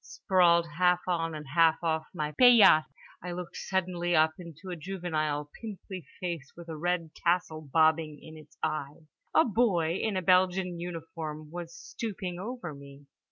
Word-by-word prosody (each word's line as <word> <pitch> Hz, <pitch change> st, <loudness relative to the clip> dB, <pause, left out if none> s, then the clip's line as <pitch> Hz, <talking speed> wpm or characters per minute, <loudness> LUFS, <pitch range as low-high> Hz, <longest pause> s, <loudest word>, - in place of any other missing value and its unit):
Sprawled 175 Hz, -3 st, +3 dB
half 180 Hz, -1 st, +4 dB
on 165 Hz, -3 st, -1 dB
and 150 Hz, 0 st, -7 dB
half 165 Hz, +1 st, +4 dB
off 160 Hz, -1 st, 0 dB
my 150 Hz, -4 st, -3 dB
paillasse, 225 Hz, -7 st, +7 dB, 0.4 s
I 180 Hz, -1 st, -4 dB
looked 180 Hz, 0 st, -7 dB
suddenly 175 Hz, -2 st, -1 dB
up 160 Hz, 0 st, +5 dB
into 170 Hz, +1 st, -9 dB
a -, -, -3 dB
juvenile 155 Hz, -4 st, -3 dB
pimply 190 Hz, -, -8 dB
face 170 Hz, -7 st, -5 dB
with 170 Hz, -1 st, -10 dB
a 160 Hz, -, -5 dB
red 170 Hz, 0 st, -2 dB
tassel 170 Hz, -2 st, 0 dB
bobbing 155 Hz, +1 st, +2 dB
in 160 Hz, -, -12 dB
its 155 Hz, 0 st, -16 dB
eyes. 150 Hz, +1 st, -3 dB, 0.3 s
A 320 Hz, -, +6 dB
boy 190 Hz, -8 st, +1 dB
in 215 Hz, -4 st, -1 dB
a 185 Hz, -, -2 dB
Belgian 180 Hz, -1 st, +2 dB
uniform 160 Hz, -3 st, -6 dB
was 170 Hz, -1 st, -7 dB
stooping 190 Hz, -5 st, -6 dB
over 220 Hz, -5 st, -6 dB
me. 140 Hz, 0 st, -13 dB
170 Hz, 160 wpm, -29 LUFS, 155-180 Hz, 0.4 s, paillasse